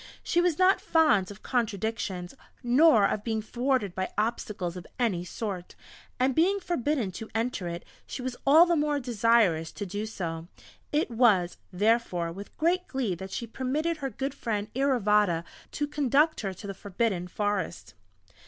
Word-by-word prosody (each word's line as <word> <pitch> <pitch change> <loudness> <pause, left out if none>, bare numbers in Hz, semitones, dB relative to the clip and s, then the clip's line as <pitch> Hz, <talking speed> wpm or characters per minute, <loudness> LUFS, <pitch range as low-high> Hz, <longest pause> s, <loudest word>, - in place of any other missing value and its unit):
She 345 - +2
was 350 -3 +1
not 375 +1 +4
fond 225 - +3
of 205 0 -11
contradictions 215 -6 -2 0.3
nor 245 -3 +5
of 205 - -1
being 220 -1 -1
thwarted 240 -2 -1
by 185 0 -2
obstacles 210 -5 -2
of 180 - -8
any 210 -8 0
sort, 185 -1 -5 0.4
and 260 +1 +2
being 375 +8 +3
forbidden 295 - -1
to 220 +5 -8
enter 225 -5 -1
it, 170 0 -5 0.2
she 255 - -6
was 255 -1 -3
all 310 +5 +7
the 345 -1 +2
more 295 -1 +1
desirous 230 - +2
to 205 - -5
do 205 +3 -4
so; 165 -6 -5 0.4
it 295 -3 0
was, 215 -7 +3
therefore, 190 -4 +1
with 195 +4 -10
great 360 +3 +1
glee 255 -8 -1
that 190 +3 -7
she 235 - -4
permitted 285 +8 -2
her 275 -2 -3
good 265 +4 -4
friend 215 -6 -3
Iravata 210 -10 +2 0.3
to 295 - -1
conduct 295 +1 +2
her 195 -3 -2
to 200 - -11
the 200 - -4
Forbidden 195 -2 -2
Forest. 190 - -3
225 Hz, 160 wpm, -28 LUFS, 190-275 Hz, 0.4 s, all